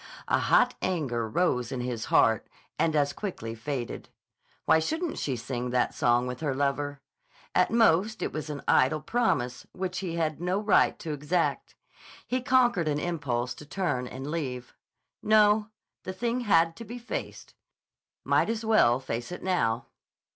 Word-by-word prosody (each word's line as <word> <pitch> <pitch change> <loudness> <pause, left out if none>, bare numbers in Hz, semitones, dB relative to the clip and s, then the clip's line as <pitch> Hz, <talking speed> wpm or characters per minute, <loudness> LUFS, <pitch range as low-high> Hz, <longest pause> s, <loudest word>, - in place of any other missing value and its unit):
A - - +2
hot - - +4
anger 130 -11 -1
rose 125 -3 0
in 130 - -3
his 120 -2 -3
heart 110 -2 +3 0.3
and 160 -1 +2
as 145 -1 +2
quickly 145 - -5
faded. 120 +1 -5 0.6
Why 160 - +5
shouldn't 320 - -2
she 135 - -1
sing 120 +1 -4
that 125 0 +1
song 120 +1 +2
with 125 0 -5
her 145 -4 -1
lover? 145 +1 -1 0.5
At - - +3
most 220 -1 +3
it - - -3
was 155 0 -4
an 145 -2 -5
idle 135 +4 +4
promise 150 - -1
which 185 -1 -3
he 180 -3 -4
had 160 -2 +1
had 155 - -15
no 180 +2 0
right 210 -1 +3
to 160 -3 -5
exact. 150 +4 -1 0.5
He 255 +1 -1
conquered 245 -9 +3
an 145 -1 +1
impulse 130 -7 -2
to 140 +4 -12
turn 145 -8 -2
and 130 +2 -7
leave. 130 -7 -4 0.5
No; 215 0 +4 0.3
the 185 - -6
thing 235 +5 -1
had 165 -8 +3
to 230 - -7
be 235 +3 -8
faced. 240 0 -6 0.7
Might - - +2
as 225 0 -2
well 175 - +4
face 120 +1 -5
it 180 - -7
now. 120 -12 0
155 Hz, 165 wpm, -28 LUFS, 125-190 Hz, 0.7 s, Why